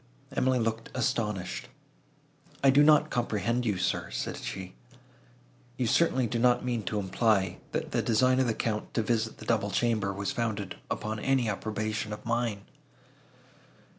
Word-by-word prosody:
Emily 130 0 +2
looked 115 -1 -1
astonished. 110 -7 -1 1.0
"I 135 - +7
do 140 +2 +6
not 150 0 +5
comprehend 120 +1 0
you, 105 -3 +1
sir," 90 - -1
said - - -3
she, 95 -1 -6 1.0
"You 125 - 0
certainly 130 +1 +3
do 115 +1 -1
not 125 +1 +3
mean 120 -2 0
to 105 - -2
imply, 100 -1 +1
that - - -3
the - - +1
design 130 +3 +3
of 130 - +3
the 115 - 0
Count 105 -2 -2
to 115 - +2
visit 110 0 0
the - - -10
double 110 -3 +1
chamber, 110 -2 +1
was 100 +4 -3
founded 110 -7 -3
upon 110 0 -3
any 130 0 +2
approbation 110 +1 -2
of 105 +1 -9
mine." 115 -3 -1
115 Hz, 155 wpm, -29 LUFS, 105-125 Hz, 1.0 s, I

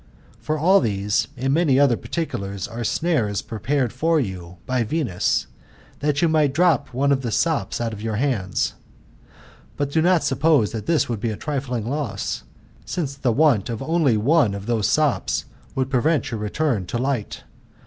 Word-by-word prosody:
For 155 - -2
all 185 +6 +5
these, 105 -3 0
and 135 +2 0
many 150 -5 +3
other 140 -4 +5
particulars, 100 - -4
are 115 - -8
sriaries 115 - 0
prepared 120 +3 -1
for 160 +5 +2
you 90 -7 -5
by 130 -1 0
Venus, 115 - 0 0.5
that 145 +1 0
you - - +5
mz.f 155 -4 +2
drop 165 -3 +2
one 140 +3 +1
of 135 -1 +2
the 120 - -3
sops 115 - 0
out 115 -1 -2
of 105 - -8
your 110 -1 -2
hands. 110 -6 0 1.0
But 140 -1 -1
do 160 - +2
not 175 0 +3
suppose 140 -4 +2
that 110 -2 -6
this 165 -2 +2
would, 115 -3 -3
be 115 +2 -1
a 105 - -4
trifling 130 -6 -3
loss; 135 - -3 0.4
since 150 -6 -3
the 135 -3 0
want 125 -5 +3
of 115 +1 -4
only 155 -6 +2
one 120 -2 +3
of 100 0 -7
these 110 -3 +1
sops, 150 +2 +1 0.3
would 130 0 -1
prevent 145 +3 +1
your 115 - -3
return 105 - -1
to 120 - -2
light. 125 -3 -2
130 Hz, 175 wpm, -22 LUFS, 110-150 Hz, 1.0 s, all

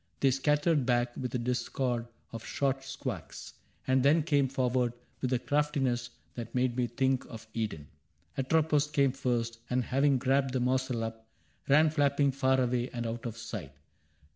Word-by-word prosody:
They 135 - +4
scattered 150 +3 +2
back 120 -1 +1
with 125 -1 -4
a - - +3
discord 120 0 -1 0.2
of 115 -1 -7
short 135 -1 -1
squawks - - -6 0.3
And 130 0 +3
then 150 +4 +4
came 145 -3 +2
forward 125 -2 0 0.3
with 130 - -1
a 125 - +3
craftiness 135 -3 0 0.2
That 120 0 -7
made 125 -1 +1
me 125 -1 +1
think 130 0 +1
of 115 -1 -10
Eden. 105 -10 -3 0.5
Atropos 150 +2 +2
Came 140 -3 +2
first, 120 -3 -1
and 125 0 +1
having 135 +2 +2
grabbed 135 +1 +1
the 130 - +1
morsel 125 -1 0
up, 115 0 -6 0.4
Ran 155 +2 +6
flapping 140 -2 +2
far 130 0 +2
away 125 0 0
and 120 -1 -4
out 115 +1 -3
of 115 -1 -6
sight. 100 -11 -6
130 Hz, 165 wpm, -30 LUFS, 120-140 Hz, 0.5 s, Ran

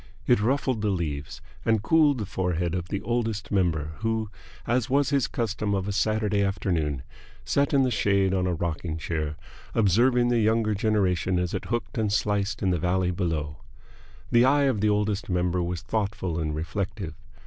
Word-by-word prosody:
It 120 -4 +4
ruffled 130 0 +1
the 105 - +1
leaves 75 -7 -3 0.2
and 110 -2 +2
cooled 150 +1 +4
the 105 - -3
forehead 90 -2 -1
of 90 -1 -3
the 100 0 -3
Oldest 115 -3 -2
Member, 85 -6 +1
who, 110 -1 -1 0.3
as 120 +1 0
was 140 +2 +2
his 140 -3 +2
custom 110 -3 -1
of 95 0 -2
a - - -1
Saturday 105 0 +1
afternoon, 85 -8 -1 0.4
sat 140 0 +1
in 140 -2 +4
the 130 - +1
shade 100 -3 +2
on 90 -1 +1
a 90 - 0
rocking 80 -1 -3
chair, 75 -2 -3 0.4
observing 120 +4 +3
the 120 -1 +2
younger 110 0 +2
generation 95 -4 +1
as 90 -1 -1
it 95 - -3
hooked 120 0 -3
and 105 -2 +1
sliced 105 0 0
in 95 - +2
the 90 - 0
valley 90 +1 +1
below. 80 -5 -2 0.7
The 120 0 +6
eye 140 +3 +4
of 130 -7 +1
the 105 - +3
Oldest 105 +1 0
Member 90 0 +1
was 85 0 -3
thoughtful 100 -5 -2
and 75 -1 -2
reflective. 95 +2 -4
100 Hz, 180 wpm, -26 LUFS, 90-110 Hz, 0.7 s, The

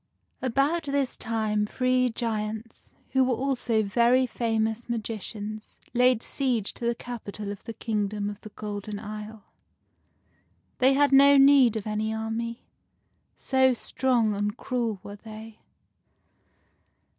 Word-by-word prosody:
About 275 +6 +1
this 280 -2 0
time 215 -2 -1
three 255 +1 +1
giants, 220 -1 -4 0.2
who 265 0 +4
were 255 -1 +1
also 245 -3 +1
very 240 +5 +3
famous 225 -1 -1
magicians, 215 -1 -5 0.2
laid 250 -1 +3
siege 245 -7 -1
to 235 - -6
the 235 - +1
capital 210 -4 -6
of 205 - -9
the 230 - -6
kingdom 210 -2 -2
of 205 0 -6
the 215 - -10
Golden 205 0 -6
Isle. 215 0 -8 1.4
They 260 +1 +5
had 285 +1 +3
no 280 +1 +7
need 270 -4 +6
of 220 - -3
any 215 0 -1
army, 225 +1 -4 0.7
so 260 -1 +2
strong 240 -3 +1
and 205 +2 -2
cruel 235 -5 -2
were 205 0 -9
they. 220 +1 -11
225 Hz, 125 wpm, -27 LUFS, 215-255 Hz, 1.4 s, no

